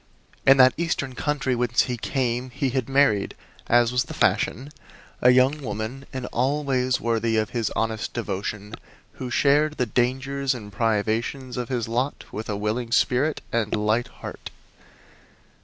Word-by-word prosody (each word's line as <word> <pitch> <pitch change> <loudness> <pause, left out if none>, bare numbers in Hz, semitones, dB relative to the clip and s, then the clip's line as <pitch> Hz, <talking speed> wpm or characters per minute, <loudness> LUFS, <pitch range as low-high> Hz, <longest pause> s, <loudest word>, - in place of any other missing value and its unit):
In 135 +1 +8
that 130 -1 +7
eastern 155 -5 -2
country 135 -2 -1
whence 120 -1 +2
he 125 - -3
came 125 0 -2
he 130 +1 -2
had 130 -1 -2
married, 135 -7 +2 0.3
as 120 0 +4
was 125 0 +1
the - - -8
fashion, 135 +7 +1 0.5
a 125 - +6
young 130 +4 +4
woman 110 +3 -5
in 130 -1 -5
all 140 +6 0
ways 130 -2 +1
worthy 115 -1 0
of 110 -1 0
his 115 -3 -1
honest 110 -1 -1
devotion, 105 -1 -4 0.5
who 130 - -3
shared 150 +4 +3
the 125 - +1
dangers 130 +3 0
and 105 -4 -9
privations 115 +4 -1
of 125 -2 -4
his 120 -4 -1
lot 125 +5 -2
with 110 +1 -6
a 105 - -1
willing 110 +3 -2
spirit 130 +4 +2
and 115 -3 0
light 110 +3 +1
heart. - - -9
125 Hz, 155 wpm, -24 LUFS, 115-135 Hz, 0.5 s, In